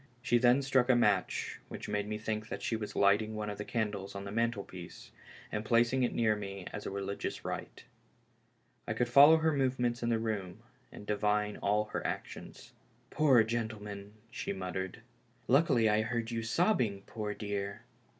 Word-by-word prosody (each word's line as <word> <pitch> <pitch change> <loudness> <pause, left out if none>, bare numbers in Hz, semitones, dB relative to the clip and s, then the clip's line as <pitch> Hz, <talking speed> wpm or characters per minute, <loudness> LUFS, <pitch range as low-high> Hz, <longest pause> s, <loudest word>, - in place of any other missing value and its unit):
She 120 -1 +2
then 125 +3 +4
struck 130 -2 +2
a 125 - +6
match, 120 - +1
which - - -7
made 105 0 -1
me 105 0 -3
think 110 0 -4
that - - -5
she 115 - 0
was 110 -2 -5
lighting 105 +2 +3
one 105 -1 -3
of 105 - -8
the - - -2
candles 105 -4 -3
on 100 - -5
the 100 - -6
mantlepiece, 105 -6 -4 0.4
and 105 - -2
placing 120 +3 +3
it 125 - +2
near 110 -2 +2
me 100 -2 -6
as 105 - -5
a - - -2
religious 100 0 -4
rite. - - -5 1.0
I - - -1
could 125 - +1
follow 145 +6 +8
her 160 0 +2
movements 125 -3 0
in 120 - 0
the 115 - +2
room 110 -2 -4 0.3
and - - -10
divine 105 0 0
all 105 +1 +1
her - - -2
actions. - - -6 0.4
"Poor 135 -7 +5
gentleman!" 105 -3 -4 0.2
she - - -3
muttered. 95 0 -5 0.2
" - - -35
Luckily 135 -5 +4
I 105 0 +3
heard 115 0 -2
you 115 -1 -2
sobbing, 115 - +1
poor 105 -2 -4
dear." 100 -2 -3
THE - - -5
LAST - - -14
HOPE. - - -28
110 Hz, 190 wpm, -32 LUFS, 105-120 Hz, 1.0 s, follow